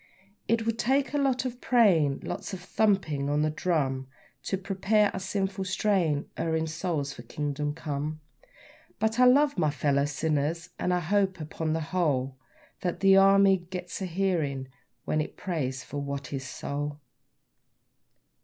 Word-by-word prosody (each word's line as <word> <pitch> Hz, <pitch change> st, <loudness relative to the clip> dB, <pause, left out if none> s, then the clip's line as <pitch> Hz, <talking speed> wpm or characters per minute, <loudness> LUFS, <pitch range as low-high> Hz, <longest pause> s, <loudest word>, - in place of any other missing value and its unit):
It 230 Hz, 0 st, +1 dB
would 230 Hz, 0 st, -1 dB
take 275 Hz, +2 st, +1 dB
a 290 Hz, -, +1 dB
lot 265 Hz, -2 st, +1 dB
of 250 Hz, -1 st, -5 dB
praying 175 Hz, -, +3 dB
lots -, -, -5 dB
of 190 Hz, -, -4 dB
thumping 180 Hz, -7 st, +1 dB
on 150 Hz, +1 st, +2 dB
the 155 Hz, -, +1 dB
drum 140 Hz, -6 st, -1 dB, 0.4 s
To 195 Hz, -, -1 dB
prepare 195 Hz, +2 st, +2 dB
our -, -, -3 dB
sinful, 195 Hz, 0 st, -2 dB
straying, 180 Hz, -6 st, +1 dB
erring 160 Hz, -1 st, 0 dB
souls 160 Hz, -3 st, -2 dB
for -, -, -10 dB
Kingdom 145 Hz, +3 st, -3 dB
Come; 155 Hz, -1 st, -4 dB, 0.8 s
But 220 Hz, +2 st, 0 dB
I 250 Hz, -, +7 dB
love 285 Hz, +3 st, +5 dB
my 155 Hz, -, +3 dB
fellow 140 Hz, 0 st, +1 dB
sinners, 155 Hz, +3 st, -1 dB
and 180 Hz, -, 0 dB
I 180 Hz, 0 st, +1 dB
hope, 190 Hz, +2 st, +1 dB
upon 155 Hz, 0 st, -3 dB
the 160 Hz, -, -1 dB
whole, 135 Hz, -7 st, +1 dB, 0.4 s
That 180 Hz, 0 st, -3 dB
the 195 Hz, -1 st, +6 dB
Army 195 Hz, 0 st, +6 dB
gets 180 Hz, +1 st, -7 dB
a 190 Hz, -, -2 dB
hearing 165 Hz, -8 st, -1 dB, 0.4 s
when 155 Hz, -, +1 dB
it 155 Hz, -, -6 dB
prays 135 Hz, -8 st, -3 dB
for 145 Hz, -, -5 dB
Watty's 140 Hz, -1 st, -4 dB
soul. 145 Hz, +3 st, -4 dB
165 Hz, 155 wpm, -28 LUFS, 145-195 Hz, 0.8 s, I